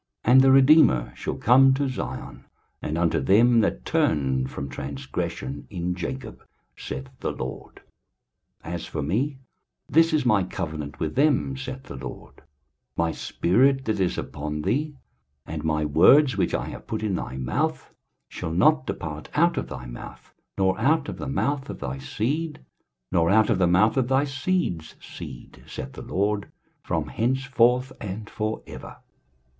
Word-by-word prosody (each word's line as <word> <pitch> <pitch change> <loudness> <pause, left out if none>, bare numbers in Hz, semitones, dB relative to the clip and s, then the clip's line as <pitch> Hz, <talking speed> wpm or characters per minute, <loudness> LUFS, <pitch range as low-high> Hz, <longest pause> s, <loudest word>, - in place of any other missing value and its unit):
23:059:020 120 - +4
And 130 - +9
the 135 0 +6
Redeemer 130 - +5
shall - - -4
come 130 +3 +5
to 140 0 0
Zion, 130 - -6 0.4
and 80 - -3
unto 85 -1 +2
them 115 - +5
that 60 - 0
turn 65 -3 +1
from 70 - -6
transgression 70 0 -5
in 90 -2 -2
Jacob, 110 +7 -6 0.3
saith 65 -1 -6
the - - -2
LORD. - - -7 0.8
23:059:021 85 - -6
As 85 - -4
for 75 - -4
me, 125 - -1 0.5
this 165 +2 +4
is 155 -4 +1
my 105 -5 +4
covenant 75 -6 -5
with 80 -1 -2
them, 140 -1 +2
saith 130 0 -6
the 70 - -9
LORD; 65 -1 -9 0.6
My 85 -1 +1
spirit 130 +13 +2
that 110 -2 -1
is 90 -2 0
upon 75 +1 -4
thee, 145 +9 -1 0.5
and 80 -1 -5
my 75 -1 0
words 130 - +6
which - - 0
I - - -2
have - - -10
put 110 0 -3
in 105 -3 0
thy 65 -7 -4
mouth, 65 -2 -2 0.3
shall 80 - -5
not 130 - +3
depart 75 -1 -5
out 170 +3 +4
of 135 - -3
thy 65 -2 -7
mouth, - - -10 0.2
nor 95 -1 +1
out 155 +1 +2
of - - -6
the - - -4
mouth 140 0 -1
of - - -5
thy 65 +2 -4
seed, 145 - -3 0.5
nor 85 -2 +3
out 110 +3 +4
of 100 - +1
the 90 - +4
mouth 95 +8 +3
of 130 -2 +2
thy 135 +2 +3
seed's 135 - -2
seed, 65 -2 -10
saith - - -7
the - - -9
LORD, 100 +1 -1 0.3
from - - -2
henceforth 130 +1 +1
and 105 +2 -6
for 110 0 -3
ever. - - -10
105 Hz, 165 wpm, -25 LUFS, -, 0.8 s, And